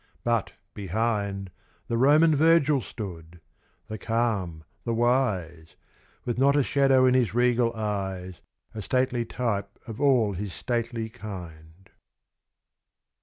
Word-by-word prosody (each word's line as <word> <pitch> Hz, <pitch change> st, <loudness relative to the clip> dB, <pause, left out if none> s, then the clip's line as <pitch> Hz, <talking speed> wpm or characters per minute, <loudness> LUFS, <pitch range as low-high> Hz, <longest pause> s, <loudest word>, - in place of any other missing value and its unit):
But, 115 Hz, -2 st, 0 dB, 0.2 s
behind, 100 Hz, -1 st, -2 dB, 0.4 s
The 115 Hz, -, -1 dB
Roman 150 Hz, +6 st, +5 dB
Virgil 150 Hz, -2 st, +4 dB
stood 90 Hz, -7 st, -8 dB, 0.5 s
the 110 Hz, -1 st, -6 dB
calm, 105 Hz, -9 st, -1 dB, 0.2 s
the 115 Hz, -, -1 dB
wise 100 Hz, -10 st, 0 dB, 0.5 s
With 120 Hz, 0 st, -2 dB
not 140 Hz, +1 st, +4 dB
a 145 Hz, -, +3 dB
shadow 135 Hz, -1 st, +3 dB
in 130 Hz, -, +4 dB
his 125 Hz, -4 st, +1 dB
regal 120 Hz, -1 st, +3 dB
eyes, 95 Hz, -4 st, -4 dB, 0.3 s
A 110 Hz, -, -6 dB
stately 125 Hz, +2 st, 0 dB
type 105 Hz, -5 st, -3 dB
of 115 Hz, +2 st, -8 dB
all 125 Hz, -8 st, +3 dB
his 95 Hz, 0 st, -5 dB
stately 115 Hz, -1 st, -3 dB
kind. 90 Hz, -5 st, -10 dB
115 Hz, 120 wpm, -26 LUFS, 95-125 Hz, 0.5 s, Roman